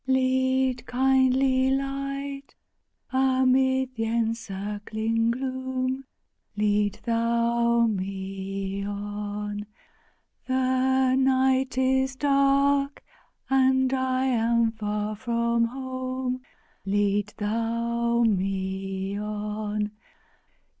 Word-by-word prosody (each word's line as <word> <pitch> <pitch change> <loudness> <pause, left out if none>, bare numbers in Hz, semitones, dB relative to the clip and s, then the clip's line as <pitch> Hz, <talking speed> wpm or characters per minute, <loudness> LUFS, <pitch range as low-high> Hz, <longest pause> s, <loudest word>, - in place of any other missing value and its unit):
Lead, 260 -1 +1
kindly 260 0 +3
Light, 275 +1 -3 0.6
amid 260 0 +2
th'encircling 225 0 -1
gloom, 260 +1 -2 0.5
Lead 210 -1 +1
Thou 235 0 +2
me 195 -1 -3
on! 205 0 -4 0.8
The 260 0 +2
night 265 -1 +2
is 265 0 +2
dark 275 0 +2 0.4
and 260 0 +3
I 260 0 +1
am 235 -2 +2
far 210 -1 -3
from 235 +1 +1
home! 255 0 -4 0.4
Lead 205 +1 0
Thou 235 +2 0
me 195 -1 -1
on! 210 0 -3
235 Hz, 70 wpm, -26 LUFS, 210-260 Hz, 0.8 s, kindly